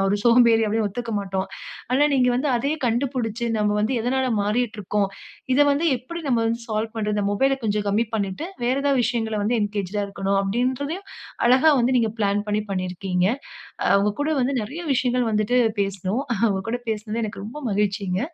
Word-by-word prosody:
நான் 195 - +2
ஒரு 205 - +2
சோம்பேறி 235 -1 +5
அப்படினு 215 0 0
ஒத்துக்க 230 +3 -5
மாட்டோம். 190 -1 -3 0.5
ஆனா 285 +3 +4
நீங்க 255 -2 +3
வந்து 275 +4 0
அதையே 280 +6 -1
கண்டுபிடிச்சு 240 -1 -1
நம்ம 210 0 +1
வந்து 220 +5 0
எதனால 260 +3 0
மாறிட்டு 220 +3 0
இருக்கோம். 200 +1 0 0.5
இத 290 - +3
வந்து 285 +4 +1
எப்படி 335 +8 -7
நம்ம 245 -3 +2
வந்து 230 +1 -1
சால்வ் 220 +1 -2
பண்றது. 210 -1 -1
இந்த 205 - 0
மொபைல்ஐ 270 +6 +2
கொஞ்சம் 210 -1 0
கம்மி 215 +4 +2
பண்ணிட்டு 205 - -2 0.2
வேறு 250 +2 +2
ஏதாவது 280 -2 +2
விஷயங்களை 225 -2 -1
வந்து 235 +3 +1
என்கேஜ்ட்ஆக 205 -1 -2
இருக்கவேண்டும். 195 0 -1
அப்டின்றதயும் 260 - -2 0.4
அழகா 260 +6 +6
வந்து 255 +2 +2
நீங்க 225 -2 +1
பிளான் 205 0 +1
பண்ணி 210 0 0
பண்ணியிருக்கீங்க. 185 -1 -1 0.6
அ - - +2
உங்க 205 +1 +1
கூட 300 +2 0
வந்து 260 +2 0
நிறைய 285 +11 -6
விஷயங்கள் 250 -1 +1
வந்துவிட்டு 215 +4 +2 0.2
பேசினோம். 195 +6 -1 0.2
அவங்க 195 -4 +2
கூட 245 +1 -2
பேசினது 220 +1 -3
எனக்கு 205 -1 -6
ரொம்ப 240 +8 -7
மகிழ்ச்சிங்க. 195 -2 0
225 Hz, 180 wpm, -23 LUFS, 205-250 Hz, 0.6 s, அழகா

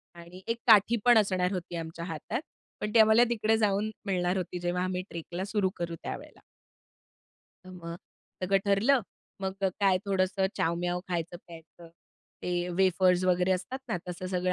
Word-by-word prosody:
आणि 170 +2 -12
एक 230 0 0
काठी 220 +1 +6
पण 240 -2 +7
असणार 185 -3 +2
होती 175 -1 -5
आमच्या 165 0 -5
हातात. 180 - -4 0.4
पण 210 - -2
ती 230 - +6
आम्हाला 220 +2 +7
तिकडे 225 -1 +2
जाऊन 210 0 +1 0.2
मिळणार 180 -1 0
होती 180 0 -4
जेव्हा 175 +1 -1
आम्ही 185 0 -2
ट्रेकला 170 +2 -5
सुरु 200 -2 0
करू 170 -1 -3
त्यावेळेला. - - -7 1.2
तर 185 - -11
मग 170 -2 -7 0.5
सगळं 195 +1 +3
ठरलं. 220 +7 +3 0.4
मग 190 0 -2
अ, 190 - +4
काय, 190 -2 +4
थोडंसं 190 0 +1
चावम्याव 175 +2 0
खायचं-प्यायचं, 170 -1 -7 0.5
ते 175 0 -1
वेफर्स 185 -1 +3
वगैरे 180 0 +2
असतात 185 +8 -3
ना, 200 - 0
तसं 180 +1 -5
सगळं 180 0 0
185 Hz, 155 wpm, -29 LUFS, 175-200 Hz, 1.2 s, पण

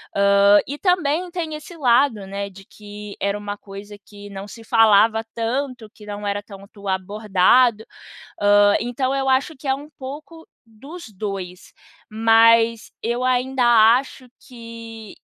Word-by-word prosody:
Hã, 200 +1 +5
e 285 - -5
também 360 -2 0
tem 330 -3 -4
esse 305 +3 -11
lado, 245 -6 +2
né, 200 +1 -5
de 195 0 -15
que 210 0 -11
era 200 +1 -1
uma 205 0 -6
coisa 205 +1 -11
que 205 -1 -13
não 195 0 -8
se 230 +2 -12
falava 220 0 +3
tanto, 240 0 -3
que 210 - -15
não 205 0 -7
era 200 0 -2
tanto 200 0 -13
abordado, 210 +4 +2 0.6
hã, 205 0 +4
então 255 +3 -2
eu 270 -1 -1
acho 265 +4 +1
que 270 +1 -9
é 265 - +3
um 285 +2 -10
pouco 300 +5 -10 0.2
dos 275 +11 -12
2, 190 -3 -7 0.4
mas 225 +1 +3
eu 240 +2 -2
ainda 255 +1 0 0.4
acho 260 -1 -10
que 230 -3 -11
225 Hz, 145 wpm, -21 LUFS, 205-260 Hz, 0.6 s, Hã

